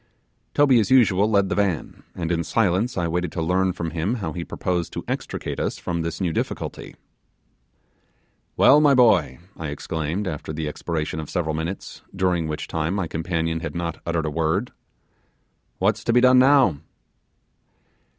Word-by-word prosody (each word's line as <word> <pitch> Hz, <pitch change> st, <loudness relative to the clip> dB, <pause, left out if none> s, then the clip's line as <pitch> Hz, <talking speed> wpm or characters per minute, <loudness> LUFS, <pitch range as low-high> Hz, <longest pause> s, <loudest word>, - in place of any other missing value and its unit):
Toby 140 Hz, -4 st, +5 dB
as 105 Hz, -, 0 dB
usual 110 Hz, -6 st, +4 dB
led 100 Hz, -3 st, +3 dB
the -, -, 0 dB
van, 95 Hz, -6 st, -1 dB
and 85 Hz, -1 st, -3 dB
in 85 Hz, -1 st, 0 dB
silence 105 Hz, +4 st, 0 dB
I 85 Hz, -2 st, 0 dB
waited 90 Hz, 0 st, -2 dB
to 85 Hz, -, -2 dB
learn 95 Hz, +3 st, +1 dB
from 85 Hz, -2 st, -4 dB
him 85 Hz, +8 st, -1 dB
how 90 Hz, -10 st, -4 dB
he 85 Hz, -, -4 dB
proposed 85 Hz, +2 st, -2 dB
to -, -, -5 dB
extricate -, -, -4 dB
us -, -, -2 dB
from 85 Hz, -1 st, -3 dB
this 85 Hz, 0 st, -4 dB
new 90 Hz, -4 st, -1 dB
difficulty. -, -, -4 dB, 1.6 s
'Well, 145 Hz, +2 st, +6 dB
my 145 Hz, -2 st, +5 dB
boy,' 100 Hz, -, +4 dB, 0.2 s
I 80 Hz, -, -5 dB
exclaimed, 80 Hz, +6 st, -3 dB
after 75 Hz, -2 st, -5 dB
the 80 Hz, 0 st, -3 dB
expiration 80 Hz, +1 st, -3 dB
of 75 Hz, -, -6 dB
several 80 Hz, -4 st, -1 dB
minutes, 80 Hz, +5 st, -5 dB
during 90 Hz, -3 st, +1 dB
which 75 Hz, 0 st, -4 dB
time 80 Hz, +3 st, -2 dB
my 95 Hz, -3 st, -1 dB
companion 80 Hz, 0 st, -2 dB
had 80 Hz, 0 st, -6 dB
not 85 Hz, -1 st, -4 dB
uttered 85 Hz, -1 st, -1 dB
a 75 Hz, -, -2 dB
word, 85 Hz, +9 st, 0 dB, 1.1 s
'what's -, -, +1 dB
to 115 Hz, -, +2 dB
be 125 Hz, -, +6 dB
done 130 Hz, 0 st, +6 dB
now? 130 Hz, -, +5 dB
85 Hz, 170 wpm, -23 LUFS, 80-100 Hz, 1.6 s, Well